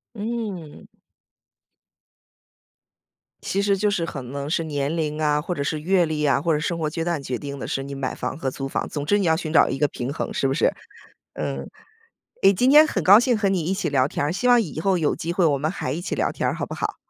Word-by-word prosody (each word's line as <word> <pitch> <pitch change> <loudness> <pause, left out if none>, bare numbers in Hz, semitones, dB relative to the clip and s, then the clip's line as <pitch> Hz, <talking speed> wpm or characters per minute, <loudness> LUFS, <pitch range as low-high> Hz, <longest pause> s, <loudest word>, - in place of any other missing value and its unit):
嗯。 210 -8 -5 2.6
其 195 - -1
实 200 0 +2
就 205 +1 +1
是 170 -5 0
可 140 -4 -6
能 140 +3 -6
是 165 - 0
年 145 0 -2
龄 155 -1 -2
啊， 150 -1 +2
或 180 - -3
者 145 - -4
是 155 +1 -2
阅 180 +1 +3
历 155 -1 -2
啊， 140 -1 +2
或 165 0 +1
者 150 - +1
是 150 - -3
生 170 -1 -3
活 155 - -1
阶 165 +2 -3
段 170 -4 -1
决 125 -2 -3
定 140 0 -7
的， - - -5
使 135 - -2
你 140 0 -7
买 135 -2 -3
房 - - -4
和 135 -4 -1
租 135 +1 -5
房， - - -2
总 145 -1 -4
之 205 +6 +3
你 195 - 0
要 160 - +4
寻 160 -1 -4
找 160 - +5
一 - - -2
个 150 - +2
平 125 +2 -4
衡， - - -4
是 135 - 0
不 135 - 0
是？ - - +2 0.6
嗯， - - -4 0.7
诶， 195 - +7
今 250 +7 +2
天 305 +2 +8
很 190 - -2
高 200 +7 +8
兴 245 -2 +2
和 200 -2 +1
你 180 -5 0
一 185 - 0
起 195 - -2
聊 135 -2 +2
天 145 - -2
儿， 150 - 0
希 250 +6 -1
望 245 -1 +6
以 160 -5 -5
后 190 +1 +2
有 155 -3 +1
机 170 +1 -4
会 180 -2 +2
我 145 -3 +3
们 155 +3 -1
还 195 - -4
一 165 - -2
起 175 - -3
聊 - - 0
天 - - -2
儿， - - -1
好 - - -3
不 - - -7
好？ - - -3
160 Hz, 275 characters per minute, -23 LUFS, 145-195 Hz, 2.6 s, 天